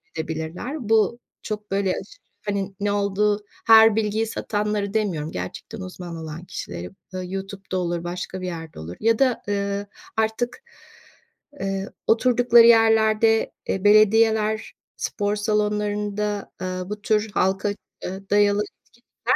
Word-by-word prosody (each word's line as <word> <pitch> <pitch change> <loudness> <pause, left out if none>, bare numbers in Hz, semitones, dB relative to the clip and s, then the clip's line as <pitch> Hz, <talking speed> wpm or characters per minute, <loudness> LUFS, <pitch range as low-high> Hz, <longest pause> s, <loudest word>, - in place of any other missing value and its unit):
edebilirler. 165 - -4
Bu 225 +1 +3 0.2
çok, 210 -2 -5
böyle, 195 -1 +1
aşırı, 195 - -7 0.3
hani, 200 -1 -2
ne 205 - +1
olduğu 205 +1 +1 0.3
her 225 -1 +8
bilgiyi 220 0 0
satanları 210 -2 -2
demiyorum, 175 -8 -1
gerçekten 90 - -6
uzman 180 -2 -7
olan 160 +1 -7
kişileri. 85 - -6 0.2
Bö 185 0 -3
YouTube'da 195 0 -5
olur, 175 -1 -1
başka 180 +1 -5
bir 185 - -3
yerde 165 - -7
olur 80 +3 -7
ya 225 0 +3
da, 255 -3 +2
ııı, 200 0 -1 0.3
artık, 220 +3 -1 1.0
eee, 195 0 -2 0.2
oturdukları 240 0 +6
yerlerde, 225 -1 +4 0.2
eee, 195 - -1
belediyeler, 215 +1 +4 0.2
spor 205 0 -1
salonlarında, 210 0 -1
aaa, 185 0 -4
bu 210 0 -5
tür 215 0 +1
halka, 190 +2 +1 0.3
eee, 190 +1 -6
dayalı 205 0 +4
etkinlikler. 240 +3 -4
205 Hz, 125 wpm, -23 LUFS, 185-220 Hz, 1.0 s, her